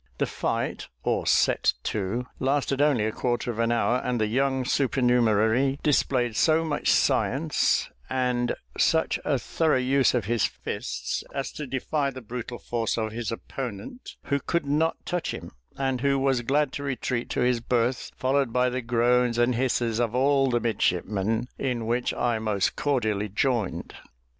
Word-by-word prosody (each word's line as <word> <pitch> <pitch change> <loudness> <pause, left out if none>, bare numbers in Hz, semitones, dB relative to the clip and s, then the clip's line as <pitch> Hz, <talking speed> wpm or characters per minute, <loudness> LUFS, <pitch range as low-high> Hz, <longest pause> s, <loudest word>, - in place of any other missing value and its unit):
The - - +1
fight, - - -2 0.2
or - - 0
set - - +3
to, 110 +4 -2
lasted 135 0 +1
only 140 -8 +3
a 110 - 0
quarter 120 +1 -1
of 115 - -7
an 115 0 +2
hour, 120 +1 +2
and 125 -1 -2
the 110 - +2
young 130 +3 0
supernumerary 125 0 +2
displayed 125 -5 +1
so 160 +4 +3
much 150 -2 -1
science, - - +2 0.2
and 125 -2 0 0.2
such 160 0 +2
a 145 - +1
thorough 155 +4 +1
use 130 +1 +3
of 120 -5 0
his 115 +1 0
fists, - - -4
as 135 - -2
to 150 - -6
defy 140 +2 -1
the 130 -1 -8
brutal 120 +1 -6
force 115 -1 -2
of 110 -1 -1
his 115 0 -4
opponent, 120 - -7
who 140 -2 0
could 170 +3 -1
not 150 +3 +1
touch 180 -2 -2
him, - - -9 0.3
and 135 -2 -1
who 140 0 +2
was 135 -2 +1
glad 140 +3 +1
to 140 - -4
retreat 130 -3 -2
to - - -1
his 125 -1 +2
berth, 120 +1 0
followed 135 -1 +1
by 125 +1 +2
the 130 +1 -2
groans 120 0 +2
and 120 +1 +3
hisses 120 -2 0
of 120 -1 0
all 135 +1 +3
the 120 -1 +2
midshipmen, 110 +1 0
in 125 -4 -1
which 120 +2 0
I 120 -2 0
most 105 -3 0
cordially 110 -7 0
joined. 115 0 -1
125 Hz, 165 wpm, -26 LUFS, 115-135 Hz, 0.3 s, set